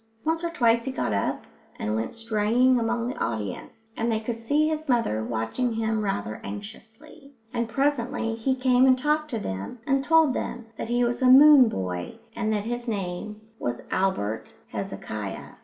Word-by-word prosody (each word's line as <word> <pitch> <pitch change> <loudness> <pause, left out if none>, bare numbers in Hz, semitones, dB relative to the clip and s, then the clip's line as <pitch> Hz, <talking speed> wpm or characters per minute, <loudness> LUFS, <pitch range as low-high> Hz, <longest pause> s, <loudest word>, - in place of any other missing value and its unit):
Once 325 +1 0
or 340 - 0
twice 235 -8 +2
he 265 - -2
got 120 - -2
up 100 - -1 0.3
and 105 +1 -2
went 110 +1 -3
straying 230 +3 +2
among 235 +1 -1
the 255 - -4
audience, 115 - -5
and 230 +1 0
they 220 - +1
could 230 +1 -4
see 290 +7 +2
his 310 -1 -3
mother 230 - +1
watching 115 - -2
him 220 -1 -1
rather 110 - -3
anxiously; 225 - -10 0.2
and 235 -1 -1
presently 245 -4 0
he 230 +4 0
came 255 0 +4
and 255 -1 +5
talked 300 +3 0
to 240 - -2
them 95 - -5
and 270 -1 +1
told 320 -2 +4
them 240 -2 -4
that 225 - -5
he 240 +1 +2
was 240 +2 -1
a 255 - +5
moon 275 -2 +9
boy 90 - -4 0.2
and 220 -2 -1
that 210 -1 -1
his 240 +1 -4
name 205 0 -4 0.2
was 120 0 -3
Albert 115 - -1
Hezekiah. - - -5
230 Hz, 175 wpm, -26 LUFS, 195-260 Hz, 0.3 s, moon